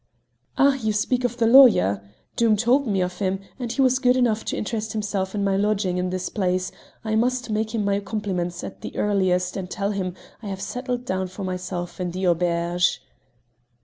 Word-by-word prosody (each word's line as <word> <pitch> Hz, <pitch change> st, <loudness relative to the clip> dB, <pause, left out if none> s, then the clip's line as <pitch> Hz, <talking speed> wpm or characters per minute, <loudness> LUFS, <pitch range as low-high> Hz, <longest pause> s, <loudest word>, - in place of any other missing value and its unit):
"Ah! 275 Hz, 0 st, +5 dB
you 220 Hz, -4 st, -1 dB
speak 245 Hz, +4 st, 0 dB
of 245 Hz, -1 st, -1 dB
the 235 Hz, -, +2 dB
lawyer: 225 Hz, -, +6 dB, 0.3 s
Doom 225 Hz, -2 st, +3 dB
told 245 Hz, +5 st, +2 dB
me 195 Hz, -3 st, +1 dB
of 180 Hz, 0 st, -5 dB
him, 190 Hz, -1 st, 0 dB, 0.2 s
and 245 Hz, -2 st, -3 dB
as 230 Hz, -, -4 dB
he 275 Hz, -, +3 dB
was 255 Hz, 0 st, +3 dB
good 250 Hz, -1 st, +3 dB
enough 225 Hz, -3 st, +2 dB
to -, -, -2 dB
interest 215 Hz, 0 st, -3 dB
himself 205 Hz, -2 st, -2 dB
in 200 Hz, -, 0 dB
my 195 Hz, -1 st, +1 dB
lodging 200 Hz, -2 st, +1 dB
in 180 Hz, 0 st, -1 dB
this 185 Hz, 0 st, -3 dB
place, 185 Hz, -2 st, -1 dB, 0.3 s
I 220 Hz, -, -1 dB
must 245 Hz, +1 st, 0 dB
make 220 Hz, +1 st, -1 dB
him 210 Hz, -2 st, 0 dB
my 200 Hz, 0 st, +1 dB
compliments 190 Hz, -4 st, -3 dB
at -, -, -8 dB
the -, -, -7 dB
earliest 185 Hz, -3 st, +1 dB
and 185 Hz, -2 st, -5 dB
tell 200 Hz, +1 st, -2 dB
him 185 Hz, -3 st, -3 dB, 0.3 s
I 215 Hz, -, -7 dB
have 195 Hz, -1 st, -4 dB
settled 250 Hz, +3 st, -4 dB
down 185 Hz, -4 st, -1 dB
for 185 Hz, +2 st, -8 dB
myself 180 Hz, -1 st, -4 dB
in 180 Hz, -, -1 dB
the 185 Hz, +2 st, -3 dB
auberge." 175 Hz, 0 st, +1 dB
200 Hz, 205 wpm, -23 LUFS, 185-230 Hz, 0.3 s, lawyer